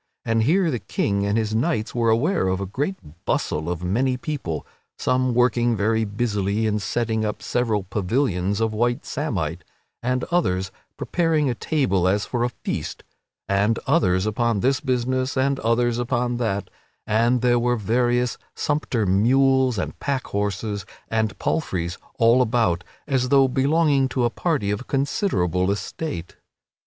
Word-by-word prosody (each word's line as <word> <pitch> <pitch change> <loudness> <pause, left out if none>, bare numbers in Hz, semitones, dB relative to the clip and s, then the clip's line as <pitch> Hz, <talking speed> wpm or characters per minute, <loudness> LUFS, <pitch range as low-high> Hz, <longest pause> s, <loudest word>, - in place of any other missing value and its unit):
And 115 0 +2
here 165 - +3
the 125 - -2
King 100 -1 -1
and 100 +2 +1
his 110 -1 0
knights 115 -1 0
were 115 -1 +1
aware 120 - +2
of 95 0 0
a 100 - -2
great 140 - -2 0.3
bustle 80 +2 -1
of 90 0 -3
many 125 +8 +1
people, 125 - -4 0.3
some 130 -1 +1
working 120 -1 +3
very 110 +2 +1
busily 105 -1 -1
in 105 -1 +1
setting 110 +1 -1
up 105 -1 -3
several 115 -5 0
pavilions 100 0 0
of 110 -1 +1
white 120 +2 0
samite, 90 - -3 0.4
and 125 +1 0
others 95 - +1 0.3
preparing 160 -5 +1
a - - -1
table 105 - +1
as 100 +2 +1
for 120 -2 -1
a 120 - +1
feast, - - -5 0.4
and 100 +3 +2
others 95 0 +2
upon 110 -1 0
this 130 +1 +2
business 130 -1 -1
and 135 +1 +1
others 115 +1 +1
upon 120 0 0
that; 100 -5 -2 0.3
and 115 +3 +2
there 120 -1 +3
were 120 +1 +1
various 120 +2 +1 0.2
sumpter 145 -7 0
mules 130 +5 +3
and 95 - -4
pack 140 -2 -2
horses 100 0 -2 0.3
and 110 -1 0
palfreys 90 - -2 0.2
all 115 +2 +5
about, 110 -7 +1 0.2
as 130 -3 +1
though 135 -1 +5
belonging 140 +1 +2
to 125 -2 0
a 120 - +1
party 145 - 0
of 105 +5 -4
considerable 135 - 0
estate. 100 - -4
115 Hz, 150 wpm, -23 LUFS, 100-130 Hz, 0.4 s, all